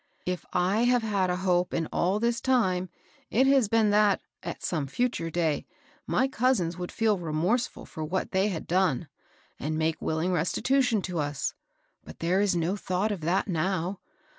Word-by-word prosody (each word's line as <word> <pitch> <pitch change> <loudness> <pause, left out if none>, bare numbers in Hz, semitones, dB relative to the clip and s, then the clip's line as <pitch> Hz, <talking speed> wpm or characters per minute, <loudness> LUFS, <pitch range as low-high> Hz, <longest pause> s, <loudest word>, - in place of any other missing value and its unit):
If 180 -2 -3
I 190 +6 +2
have 245 -1 +3
had 200 -4 +1
a 180 - +1
hope 180 -1 +2
in 165 - 0
all 190 +4 +1
this 235 +1 0
time 185 -9 +1 0.4
it 255 +5 +3
has 270 -4 +4
been 220 -1 +3
that, 205 -1 +4 0.2
at - - -6
some 155 -5 -1
future 230 - -1
day, 160 -3 -1 0.4
my 260 - +2
cousins 235 -10 +1
would 180 0 -5
feel 220 -4 +1
remorseful 175 +10 -1
for 155 - -7
what 180 +5 -2
they 190 +1 +2
had 180 -6 -3
done, 180 -7 +1 0.5
and 155 +2 -2
make 160 0 0
will 160 - -1
ing 175 +4 0
restitution 230 - +1
to 180 -3 -3
us. 145 -1 -2 0.5
But - - -11
there 180 +4 +1
is 200 -3 +2
no 170 +3 0
thought 195 +1 -1
of 195 -5 -4
that 175 +7 +1
now. 185 +1 -1
185 Hz, 180 wpm, -27 LUFS, 170-220 Hz, 0.5 s, has